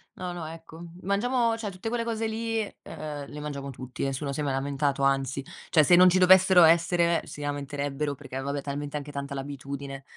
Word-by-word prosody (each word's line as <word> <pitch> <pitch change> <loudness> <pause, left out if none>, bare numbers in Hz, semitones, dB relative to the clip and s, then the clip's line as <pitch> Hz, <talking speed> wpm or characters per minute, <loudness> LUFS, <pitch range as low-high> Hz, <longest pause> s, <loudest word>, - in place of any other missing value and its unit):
No, 180 -1 -5
no, 175 -2 -6
ecco, 165 +1 -10 0.2
mangiamo 230 +4 +1
cioè, 225 -2 -4
tutte 190 +4 -7
quelle 235 0 -1
cose 225 -1 -2
lì, 225 0 -2 0.2
ehm, 150 -2 -7
le 150 - -8
mangiamo 140 -2 -5
tutti, 130 -1 -7
nessuno 140 +1 -2
si 140 - -4
è - - 0
mai 140 -2 -1
lamentato, 140 +1 -1
anzi; 135 0 +1 0.3
cioè 155 - +5
se 175 - +6
non 180 +1 +8
ci 185 - +3
dovessero 185 0 +7
essere, 170 +1 +4
si 150 - -9
lamenterebbero 145 0 -3
perché, 140 -1 -10
eh, - - -2
vabbè, 140 +1 -3
talmente 145 +1 -4
anche 145 0 -7
tanta 140 0 -5
l'abitudine. 140 0 -6
150 Hz, 200 wpm, -27 LUFS, 140-180 Hz, 0.3 s, non